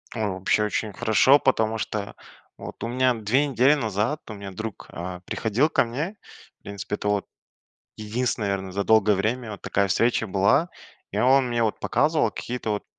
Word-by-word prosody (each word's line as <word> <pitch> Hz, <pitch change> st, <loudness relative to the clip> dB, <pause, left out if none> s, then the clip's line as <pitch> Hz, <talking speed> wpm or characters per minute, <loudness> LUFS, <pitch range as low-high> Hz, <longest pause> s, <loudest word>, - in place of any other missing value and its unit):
О, -, -, -4 dB, 0.2 s
вообще 95 Hz, +3 st, +1 dB
очень 105 Hz, 0 st, -2 dB
хорошо, 120 Hz, +6 st, +4 dB
потому 115 Hz, -5 st, +1 dB
что 105 Hz, -2 st, -4 dB, 0.4 s
вот, -, -, -9 dB
у 115 Hz, -, -1 dB
меня 125 Hz, +1 st, +2 dB
2 115 Hz, +5 st, +1 dB
недели 135 Hz, +2 st, +4 dB
назад 115 Hz, +2 st, -1 dB
у -, -, -5 dB
меня 100 Hz, -1 st, -8 dB
друг, 110 Hz, +2 st, -7 dB
а, 90 Hz, +1 st, -6 dB
приходил 120 Hz, +8 st, 0 dB
ко -, -, +3 dB
мне. 145 Hz, -, -4 dB, 0.4 s
В -, -, -46 dB
принципе 100 Hz, 0 st, -5 dB
это, 105 Hz, -, -5 dB
вот, 105 Hz, -1 st, 0 dB, 0.7 s
единственная, 110 Hz, 0 st, -2 dB
наверное, 95 Hz, -1 st, -3 dB
за 100 Hz, +1 st, -2 dB
долгое 110 Hz, -2 st, +4 dB
время 115 Hz, +4 st, -1 dB
вот 100 Hz, -, -10 dB
такая 100 Hz, -1 st, 0 dB
встреча 115 Hz, +4 st, +1 dB
была, 100 Hz, -, +2 dB, 0.4 s
и 100 Hz, -, -3 dB
он 130 Hz, +2 st, +4 dB
мне, 120 Hz, -1 st, 0 dB
вот, 110 Hz, -, -1 dB
показывал 150 Hz, +6 st, +2 dB
какие-то, 120 Hz, -2 st, -5 dB
вот 105 Hz, -1 st, -2 dB
110 Hz, 180 wpm, -24 LUFS, 100-125 Hz, 0.7 s, хорошо